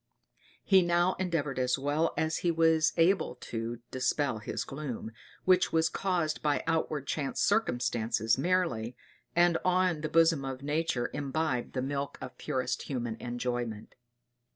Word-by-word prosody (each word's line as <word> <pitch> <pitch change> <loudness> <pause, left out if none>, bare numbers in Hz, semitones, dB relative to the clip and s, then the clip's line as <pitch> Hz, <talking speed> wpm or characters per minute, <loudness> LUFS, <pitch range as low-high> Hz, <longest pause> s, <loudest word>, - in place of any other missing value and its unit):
He 190 -2 +6
now 175 +1 +2
endeavored 160 -8 -1
as 125 0 +1
well 145 +4 0
as 160 0 0
he 175 - 0
was 160 -1 +3
able 175 +2 +3
to 115 +1 -5
dispel 130 -1 0
his 105 - -3
gloom, 135 -6 -6 0.3
which 185 0 +4
was 160 0 +3
caused 175 -5 -1
by 150 -1 +1
outward 160 -3 -1
chance 140 -1 -2
circumstances 115 - +1
merely, 135 -8 0 0.4
and 175 -1 +4
on 180 -3 +2
the 155 - -2
bosom 165 -3 +4
of 135 0 -5
nature 145 -4 -1
imbibe 145 -2 -2
the 130 - -1
milk 140 +1 -3
of 130 - -8
purest 130 -4 -2
human 120 -4 -2
enjoyment. 120 -3 -4
145 Hz, 140 wpm, -30 LUFS, 125-165 Hz, 0.4 s, He